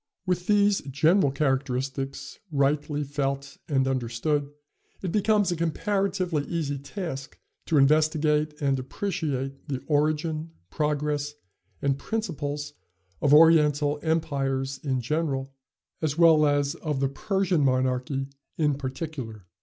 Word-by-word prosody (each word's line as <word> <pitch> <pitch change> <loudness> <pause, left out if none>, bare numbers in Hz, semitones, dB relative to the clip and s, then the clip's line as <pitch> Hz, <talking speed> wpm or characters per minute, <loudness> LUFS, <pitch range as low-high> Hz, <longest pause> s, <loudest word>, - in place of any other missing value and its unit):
With 180 -1 -1
these 205 -1 +4
general 150 +5 +3
characteristics 135 -1 -2
rightly 145 +1 +1
felt 140 0 -3
and 135 -2 +1
understood 135 +3 -1 0.5
it 185 - -2
becomes 210 -1 +2
a - - 0
comparatively 185 -1 0
easy 145 -5 -2
task 140 -2 -6 0.3
to 160 - +2
investigate 150 +1 +3
and 135 -2 +1
appreciate 135 -3 -3
the 135 -2 -4
origin, 155 +2 0 0.2
progress 150 -1 -1 0.5
and 140 -1 +1
principles 150 -10 -3 0.5
of 145 - +3
Oriental 150 -2 +5
empires 135 -4 -1
in 130 -3 0
general, 135 0 -2 0.5
as 155 -1 -1
well 160 -3 +6
as 145 -1 +1
of 150 -4 -3
the 135 - +2
Persian 190 +2 0
monarchy 130 +1 0 0.3
in 150 -2 +2
particular. 130 - -6
145 Hz, 115 wpm, -26 LUFS, 135-160 Hz, 0.5 s, well